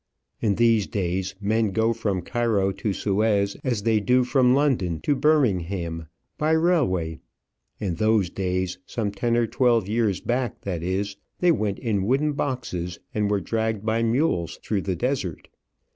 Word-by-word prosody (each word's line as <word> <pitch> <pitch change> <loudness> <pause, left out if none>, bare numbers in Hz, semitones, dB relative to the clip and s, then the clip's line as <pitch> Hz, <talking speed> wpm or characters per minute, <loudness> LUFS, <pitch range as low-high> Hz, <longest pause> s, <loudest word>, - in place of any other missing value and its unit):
In 105 -3 +2
these 115 -2 +3
days 95 -2 -2
men 110 +1 +1
go 110 +4 +1
from 105 -6 -2
Cairo 110 -3 +1
to 100 +2 -2
Suez 100 0 +1
as 120 -6 -1
they 110 -1 +3
do 125 +4 +3
from 125 0 +3
London 120 - +1
to 145 - +2
Birmingham 95 - +1 0.3
by 155 +1 +2
railway; 125 - +1 0.6
in 95 -5 -2
those 105 -1 +2
days 95 -1 -2
some 105 -4 -2
ten 115 +4 0
or 120 - +3
twelve 115 -3 +2
years 105 -3 +1
back, 125 -1 -2
that 90 -4 -3
is 100 +3 -2 0.2
they 180 -1 +4
went 105 -8 0
in 110 -5 -1
wooden 145 +4 +2
boxes, 90 -12 -3 0.2
and 105 -1 0
were 100 -1 +1
dragged 110 -1 -2
by 110 +1 +1
mules 115 - 0
through 105 -3 -1
the 95 -1 -2
desert. 105 - -3
105 Hz, 160 wpm, -24 LUFS, 95-120 Hz, 0.6 s, they